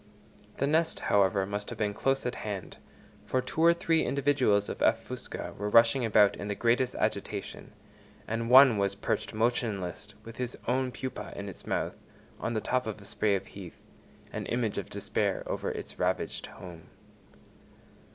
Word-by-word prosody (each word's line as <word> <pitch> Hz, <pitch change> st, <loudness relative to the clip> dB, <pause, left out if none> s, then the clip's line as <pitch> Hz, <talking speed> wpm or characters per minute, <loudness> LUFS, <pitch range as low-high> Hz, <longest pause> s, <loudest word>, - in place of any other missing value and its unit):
The 140 Hz, -, +1 dB
nest, 160 Hz, +3 st, +1 dB
however, 100 Hz, -1 st, +3 dB
must 100 Hz, +1 st, -4 dB
have -, -, -6 dB
been 105 Hz, -1 st, 0 dB
close 135 Hz, +5 st, 0 dB
at 125 Hz, -, -1 dB
hand, 100 Hz, -6 st, -6 dB, 0.5 s
for 130 Hz, -, +1 dB
two 130 Hz, +5 st, -3 dB
or 170 Hz, -, +8 dB
three 165 Hz, -1 st, +2 dB
individuals 130 Hz, -7 st, +2 dB
of -, -, -6 dB
F. -, -, +3 dB
fusca -, -, -6 dB
were 105 Hz, 0 st, -1 dB
rushing 115 Hz, +4 st, +5 dB
about 105 Hz, -3 st, +5 dB
in 105 Hz, -, -6 dB
the 105 Hz, -, -2 dB
greatest 120 Hz, +3 st, +1 dB
agitation, -, -, -3 dB, 0.5 s
and 115 Hz, +1 st, -2 dB
one 130 Hz, -4 st, +8 dB
was 100 Hz, 0 st, +1 dB
perched 100 Hz, -, -2 dB
motionless 110 Hz, -5 st, -1 dB, 0.2 s
with 115 Hz, +1 st, -11 dB
its 125 Hz, -1 st, -3 dB
own 130 Hz, +1 st, +1 dB
pupa 105 Hz, -1 st, -6 dB
in 100 Hz, -, -6 dB
its 95 Hz, -, -9 dB
mouth -, -, -2 dB, 0.4 s
on 115 Hz, -, -2 dB
the 110 Hz, -, 0 dB
top 125 Hz, -2 st, 0 dB
of 110 Hz, -1 st, -4 dB
a 100 Hz, -, -13 dB
spray 105 Hz, 0 st, +1 dB
of 95 Hz, -, -3 dB
heath, 95 Hz, -4 st, -11 dB, 0.5 s
an -, -, -4 dB
image 120 Hz, -3 st, -1 dB
of -, -, -7 dB
despair -, -, -1 dB
over -, -, -3 dB
its -, -, -6 dB
ravaged -, -, -1 dB
home. 85 Hz, -3 st, -11 dB
115 Hz, 170 wpm, -29 LUFS, 100-130 Hz, 0.5 s, or